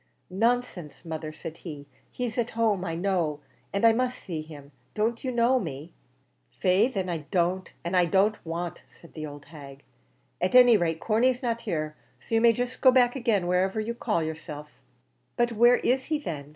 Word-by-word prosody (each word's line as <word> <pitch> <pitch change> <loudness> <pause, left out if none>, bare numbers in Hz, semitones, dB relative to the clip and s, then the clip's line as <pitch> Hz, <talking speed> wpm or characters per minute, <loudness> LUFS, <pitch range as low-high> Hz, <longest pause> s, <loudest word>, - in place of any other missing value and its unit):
"Nonsense, 210 - -1
mother," 160 -1 -5
said 160 +1 -8
he; 150 -5 -9 0.2
"he's 245 -3 -4
at 235 0 0
home 215 -5 +2
I 165 -3 -3
know, 170 -5 0 0.3
and 200 +3 +1
I 225 - +7
must 250 +2 -1
see 165 -5 -5
him. 145 -2 -12 0.2
Don't 225 +2 -1
you 260 - -1
know 240 +2 +3
me?" 155 - -7 0.6
"Faix, 190 - +1
then, 190 -1 -1
I 170 -2 -2
don't 180 0 0
and 175 +2 -2
I 180 -1 +5
don't 195 +5 +2
want," 170 +1 -5
said 170 - -18
the 155 -1 -6
old 145 -1 -11
hag. 140 -3 -12 0.6
"At 185 +6 0
any 245 -2 +8
rate, 165 -4 0
Corney's 245 +4 +1
not 235 -1 -1
here; 155 -3 -2 0.2
so - - -9
you 225 - +4
may 235 0 +7
jist 245 +2 -3
go 260 - +7
back 250 -1 +4
agin, 230 -7 +1
whoever 185 +4 +1
you 220 +2 -2
call 215 -7 -1
yerself." 155 -2 -7 0.7
"But 240 -1 +2
where 240 +2 +5
is 260 +1 0
he, 310 - 0
then? 150 - -6
190 Hz, 190 wpm, -27 LUFS, 160-235 Hz, 0.7 s, any